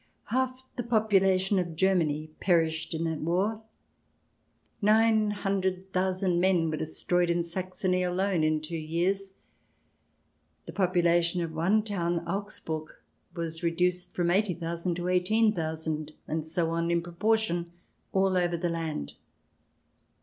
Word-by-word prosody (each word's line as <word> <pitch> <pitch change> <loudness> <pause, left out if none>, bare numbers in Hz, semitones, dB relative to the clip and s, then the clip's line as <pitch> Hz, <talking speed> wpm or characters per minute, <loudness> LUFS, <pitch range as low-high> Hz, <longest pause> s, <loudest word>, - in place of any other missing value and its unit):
Half 260 +1 -1
the - - 0
population 195 -4 +3
of 170 -3 -3
Germany 155 -4 +1
perished 165 -2 +1
in 160 - -2
that 160 -2 -2
war. 190 +7 0 1.2
Nine 215 0 +4
hundred 190 -2 -2
thousand 185 -1 +1
men 175 -3 +2
were 155 - -2
destroyed 175 +3 0
in 170 0 +1
Saxony 185 +1 -2
alone 180 -1 +1
in 155 0 +2
two 160 +2 -5
years. 185 +5 -1 1.3
The - - -8
population 175 -2 +2
of 165 - -4
one 190 +7 +2
town, 170 -5 -2
Augsburg, 170 -5 -4 0.5
was 165 -1 -4
reduced 180 +1 0
from 175 -1 +1
eighty 190 -1 +2
thousand 170 +1 -2
to 175 +1 -3
eighteen 210 +5 +3
thousand, 160 -3 -3
and 160 0 -2
so 165 +1 -1
on, 170 0 0
in 170 0 +1
pro 175 0 -9
portion 175 -4 +1 0.4
all 190 -1 +2
over 175 -1 +1
the 175 +1 -1
land. 160 - -3
175 Hz, 135 wpm, -28 LUFS, 165-195 Hz, 1.3 s, Nine